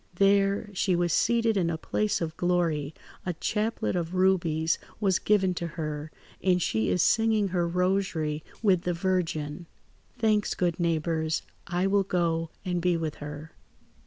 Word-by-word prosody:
"There, 200 +2 +3
she 185 -1 +1
was 175 -2 +1
seated 230 -2 +2
in 175 -3 +1
a 165 - -2
place 210 +5 -1
of 160 -1 -3
glory, 165 -5 0 0.3
a 180 - -2
chaplet 210 +5 -1
of 175 0 -2
rubies 170 -4 +2 0.2
was 195 -3 +2
given 195 -3 +2
to 170 -1 -3
her, 150 -1 -4 0.3
and 180 -1 +3
she 110 -9 0
is 180 - +2
singing 220 -3 +3
her 175 -1 0
rosary 180 -4 0 0.2
with 190 -5 +4
the 180 0 -1
Virgin. 170 -3 -2 0.5
"Thanks, 215 -2 +1
good 175 -2 0
neighbours. 160 -1 0 0.2
I 175 +1 0
will 200 +1 +3
go 165 -3 0 0.2
and 180 -1 -1
be 175 -1 +2
with 160 -2 -3
her." 150 +2 -8
175 Hz, 155 wpm, -27 LUFS, 160-195 Hz, 0.5 s, with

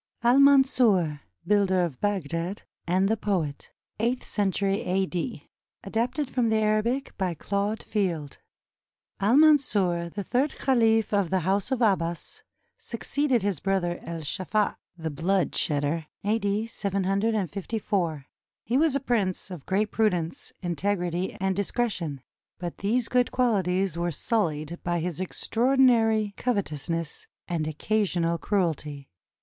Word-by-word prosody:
AL 245 +3 +5
MANSUR, 245 - +4 0.2
BUILDER 195 -3 +3
OF 155 -8 -4
BAGDAD, 180 -1 -2 0.2
AND 185 +3 +2
THE 220 +2 +1
POET 180 -9 -2 0.3
[Eighth 240 +3 0
century 200 0 0
a.d.] 190 +4 -2 0.4
ADAPTED 250 +6 -1
FROM 245 -3 0
THE 220 - +2
ARABIC 215 +5 0
BY 185 -3 0
CLAUDE 200 +6 -2
FIELD 170 -9 -2 0.8
Al 215 +7 +4
Mansur, 205 - +4
the 200 +4 -5
third 265 +8 0
caliph 225 -5 +2
of 200 -4 +2
the 190 -1 +1
House 190 +5 0
of 260 -2 0
Abbas, 190 - 0 0.4
succeeded 255 0 -1
his 200 -6 -1
brother 180 -2 0
Es 165 -3 -6
Saffah 205 +5 0 0.2
("the 160 -2 -4
blood 175 +4 +1
shedder") 150 +2 0 0.2
A.D. 205 0 0
754. 195 -5 -1 0.4
He 240 +4 0
was 315 -3 +3
a - - +2
prince 205 -8 -1
of 170 -6 -8
great 205 +2 +1
prudence, 180 -7 -1
integrity, 175 +1 -1
and 190 0 0
discretion; 190 - -2 0.4
but 175 -1 -6
these 230 +4 +1
good 250 -1 +2
quahties 195 -7 +1
were 175 0 0
sullied 165 -3 -1
by 175 0 0
his 175 +1 -3
extraordinary 225 0 +2
covetousness 165 - -2 0.2
and 165 -3 -1
occasional 170 0 0
cruelty. 155 -8 -1
195 Hz, 125 wpm, -26 LUFS, 170-225 Hz, 0.8 s, AL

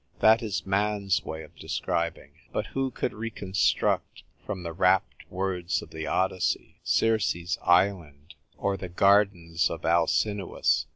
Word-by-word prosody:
That 110 +1 +6
is 105 -4 -3
man's 100 0 +1
way 80 0 -6
of 75 - -16
describing. 85 0 -3 0.2
But - - -2
who 135 0 0
could 125 - -3
reconstruct, 105 -4 -1 0.2
from 95 -2 -5
the 85 -1 -5
rapt 95 +2 +1
words 90 -2 -2
of - - -14
the 80 0 -5
Odyssey, 95 -1 -1
Circe's 90 -6 +1
island 85 -5 +1 0.2
or 100 -1 -1
the 90 -1 -7
gardens 90 -3 +3
of 80 - -6
Alcinous 90 +4 +1
95 Hz, 130 wpm, -27 LUFS, 85-100 Hz, 0.2 s, That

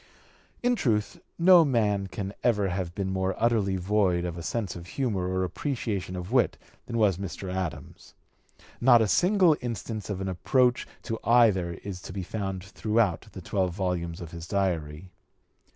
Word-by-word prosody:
In 245 0 +3
truth, 105 - 0 0.2
no 175 0 +7
man 105 -8 +1
can 100 0 -5
ever 105 -5 +2
have 90 -1 -3
been 95 -1 -2
more 95 0 -1
utterly 110 -5 +1
void 95 -2 +1
of 85 -2 -4
a 85 - -6
sense 100 +2 -3
of 85 0 -9
humor 105 -6 -1
or 95 0 0
an - - +1
appreciation 100 - -3
of 90 +3 -6
wit 125 -1 +2 0.3
than 115 - -3
was 105 -6 +3
Mr. 95 -1 -5
Adams. 85 -6 -6 0.7
Not 120 -2 +6
a - - +1
single 180 - +4
instance 115 -3 -5
of 100 -2 -3
an 95 - -3
approach 125 +7 +1 0.2
to 115 -2 -4
either 105 -8 +4
is 95 -3 -6
to - - -9
be 95 - -4
found 95 -1 -4
throughout 105 -1 0
the - - -8
twelve 90 -3 -1
volumes 90 -2 -2
of 85 -2 -8
his 85 0 -8
Diary. 90 -3 -2
100 Hz, 170 wpm, -27 LUFS, 90-115 Hz, 0.7 s, no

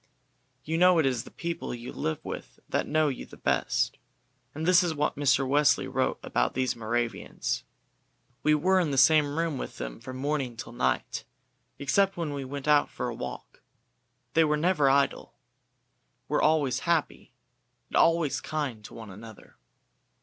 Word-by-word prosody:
You 160 +2 -1
know 180 0 +6
it 160 - +3
is 125 -3 0
the - - -10
people 170 -6 -4
you 120 +1 -8
live 80 - -3
with - - -7
that - - -1
know 155 0 +2
you 135 - -3
the - - -13
best, - - 0 0.6
and 155 +2 -3
this 180 0 +6
is 170 -3 -1
what 150 0 0
Mr. 135 -1 +2
Wesley 145 +1 +3
wrote - - -1
about - - 0
these 130 0 0
Moravians. 115 +1 -2 0.8
"We 150 0 +4
were 185 +5 +3
in 170 -4 +1
the 135 - -1
same 145 +2 +5
room 165 -5 -1
with - - -6
them - - -6
from 130 0 -8
morning 135 -3 -2
till 115 - -7
night, - - -1 0.5
except 195 +8 +1
when 160 -4 -2
we 140 -1 -4
went 140 +2 -6
out 150 -1 +4
for 125 -1 -4
a - - -4
walk. 65 -12 -8 0.7
They 165 - +5
were 150 -1 +2
never 155 -3 +3
idle, 140 +1 +1 0.9
were - - +1
always 145 -5 +2
happy, 170 -3 -1 0.5
and - - -6
always 165 -3 +3
kind 140 -8 -3
to - - -11
one 110 -3 -9
another. 110 +3 -13
145 Hz, 170 wpm, -28 LUFS, 125-160 Hz, 0.9 s, know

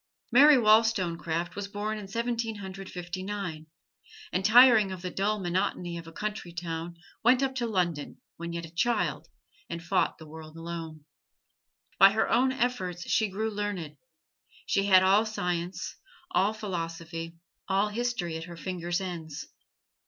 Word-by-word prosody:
Mary 280 +4 +8
Wollstonecraft 185 -7 +2
was 200 0 -4
born 210 +2 -3
in 200 - -8
Seventeen 230 +1 -2
Hundred 195 -1 -8
Fifty 180 +1 -6
nine; 185 -6 -5 0.7
and 185 - 0
tiring 225 -2 +7
of 185 -1 -7
the 180 - -3
dull 205 +3 0
monotony 175 -1 -1
of 165 -1 -7
a - - -9
country 210 -1 -4
town 170 0 -5 0.3
went 250 +3 +5
up 265 -1 0
to 245 -2 -1
London 175 -8 -1 0.2
when 170 0 -6
yet 170 0 -4
a 165 - -14
child 240 +7 0 0.4
and 170 0 -5
fought 180 +2 +1
the 160 - -12
world 155 +1 -11
alone. 165 -2 -7 0.9
By 195 +1 +8
her 220 - +2
own 260 +2 +3
efforts 190 -9 -2
she 220 -2 +3
grew 215 +3 -2
learned; 200 -8 -4 0.7
she 195 - +1
had 185 -1 +7
all 195 +3 +5
science, 180 -4 -3 0.3
all 200 - +3
philosophy, 165 -5 -5 0.3
all 195 +2 +2
history 215 -7 -2
at 160 - -6
her 170 -1 -10
fingers' 175 0 -2
ends. 165 -5 -6
185 Hz, 150 wpm, -28 LUFS, 170-215 Hz, 0.9 s, Mary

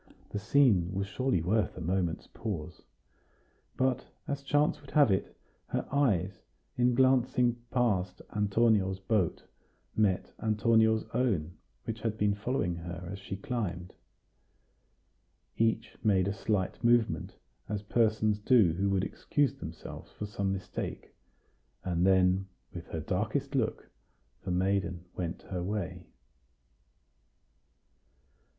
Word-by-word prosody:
The 105 - -2
scene 105 -6 +4
was 100 0 0
surely 125 -3 0
worth 105 +4 +1
a - - -5
moment's 85 -1 -1
pause. 90 -7 -6 1.0
But, 130 -1 +1 0.2
as 140 -1 -2
chance 145 +1 +1
would 145 - -14
have 145 -8 +5
it, 95 - -1 0.3
her - - -2
eyes, 100 - +1 0.3
in 125 0 +3
glancing 125 -2 +3
past 100 -8 +1 0.2
Antonio's 105 -2 +2
boat, 95 -3 0 0.5
met 100 -4 +1
Antonio's 110 0 +3
own, 100 -10 0 0.3
which 115 0 -4
had 110 -1 -2
been 105 -1 +2
following 100 -5 -1
her 85 +1 -7
as 100 - -6
she 95 0 -6
climbed. 95 -6 -3 1.6
Each 115 0 0
made 95 -4 +3
a 100 - 0
slight 100 0 -1
movement, 120 -1 +2 0.3
as 105 -1 -2
persons 110 -1 +2
do 105 -6 +5
who 95 +4 0
would 95 -1 +1
excuse 140 +6 0
themselves 80 - -9
for 105 - -5
some 100 -1 -2
mistake; 95 -1 -5 0.7
and 90 0 +1
then, 95 0 +4 0.3
with 85 -1 -7
her 80 - -4
darkest 110 - -1
look, 125 -5 -1 0.6
the - - -3
maiden 90 -1 0
went 85 -2 -4
her 90 -2 -4
way. 90 -3 -4
100 Hz, 120 wpm, -30 LUFS, 90-115 Hz, 1.6 s, have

